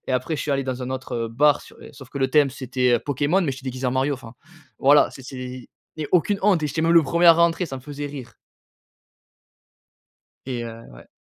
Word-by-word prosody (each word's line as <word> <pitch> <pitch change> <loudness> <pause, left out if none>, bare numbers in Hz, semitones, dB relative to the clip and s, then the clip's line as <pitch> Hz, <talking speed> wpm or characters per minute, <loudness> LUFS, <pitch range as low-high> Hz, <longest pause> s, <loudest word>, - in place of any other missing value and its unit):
et - - -2
après 130 +5 -1
je - - -3
suis 150 - -3
allé 135 0 0
dans 130 -1 -4
un 125 - -5
autre, 130 0 -5
heu, - - -7
bar 145 +5 +3
s - - -15
é - - -12
sauf 135 -3 -13
que 140 - -7
le 135 0 +1
thème 145 -2 +4
c'était, 130 -1 0
heu, 120 - +2
Pokémon 145 +6 0
mais 150 - 0
j'étais 135 0 -8
déguisé 130 0 -3
en - - +1
Mario, 135 +2 0
enfin 120 -2 -12 0.4
voilà 145 +2 +5
c'est 135 - -12
c'est 125 -1 -8 0.3
et 155 -2 -4
aucune 195 +3 +2
honte 190 -6 +3
et - - +1
j'étais 160 +4 -2
même 165 +1 +3
le 165 -1 +7
1er 170 +4 +2
à 165 - +11
rentrer. 170 +1 +2
Ça 135 -3 -6
me - - -9
faisait 145 0 -6
rire 130 -6 -9 2.1
et 125 -3 -3
heu, 115 0 -9
ouais. - - -15
135 Hz, 240 wpm, -23 LUFS, 130-150 Hz, 2.1 s, à